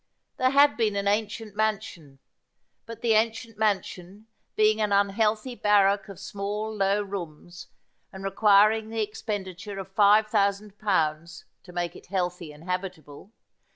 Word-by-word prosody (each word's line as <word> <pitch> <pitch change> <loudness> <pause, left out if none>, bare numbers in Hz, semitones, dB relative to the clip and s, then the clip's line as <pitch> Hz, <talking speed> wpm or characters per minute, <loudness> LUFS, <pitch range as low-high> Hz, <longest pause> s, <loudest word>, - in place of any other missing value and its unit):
There 255 - +3
had 280 -3 +4
been 220 -3 +1
an 200 0 -1
ancient 215 0 -2
man 215 -1 +1
sion; 145 -5 -13 0.7
but 230 -1 -9
the 230 -2 +2
ancient 225 +1 0
mansion, 200 -1 -2 0.3
being 215 0 +3
an 210 -1 0
unhealthy 210 +4 +1
barrack 205 -2 +2
of 195 -2 -10
small 205 +2 -4
low 200 0 +1
rooms, 175 -2 -8 0.4
and 190 0 -10
requiring 210 +2 +4
the 225 -1 -1
expenditure 205 -2 -6
of 195 0 -7
five 210 +1 +5
thousand 205 -1 -1
pounds 170 -4 -1 0.2
to 180 - -14
make 175 -1 -3
it - - -14
healthy 180 -3 -3
and 150 +1 -15
habitable. 180 -2 -6
200 Hz, 145 wpm, -26 LUFS, 185-215 Hz, 0.7 s, five